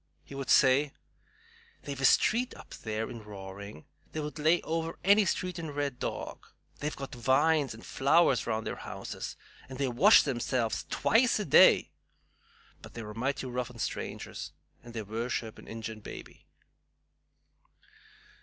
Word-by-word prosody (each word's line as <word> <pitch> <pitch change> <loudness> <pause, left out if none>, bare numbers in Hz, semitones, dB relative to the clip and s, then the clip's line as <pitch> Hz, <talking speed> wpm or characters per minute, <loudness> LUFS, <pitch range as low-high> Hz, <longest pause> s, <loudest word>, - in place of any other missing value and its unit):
He - - -13
would 135 -2 -5
say, 140 +1 +5 0.9
"They've 140 -2 -5
a - - +3
street 240 - +3
up - - -12
there 110 0 -4
in 115 - -8
'Roaring' 100 -4 -9 0.3
that 155 - -3
would 150 +1 -6
lay 160 +3 +4
over 165 0 -2
any 200 +2 +5
street 180 -1 -2
in 160 -2 -5
Red 145 -3 -3
Dog. - - -5 0.3
They've 150 +1 -3
got 135 +1 -7
vines 135 +2 +2
and 115 - -13
flowers 135 -2 +3
round 110 -1 -1
their - - -4
houses, - - -6 0.3
and 130 - -7
they 140 0 0
wash 155 - +6
themselves 125 -3 -1
twice 235 +2 +3
a 210 - -2
day. 140 - +6 0.9
But - - -13
they're 110 -2 -6
mighty 135 +5 -2
rough 125 0 -3
on 125 - -13
strangers, - - -5 0.3
and 120 -1 -12
they 110 - -3
worship 110 +1 -4
an - - -14
Ingin 110 -1 -6
baby." 105 - -11
135 Hz, 150 wpm, -30 LUFS, 115-155 Hz, 0.9 s, wash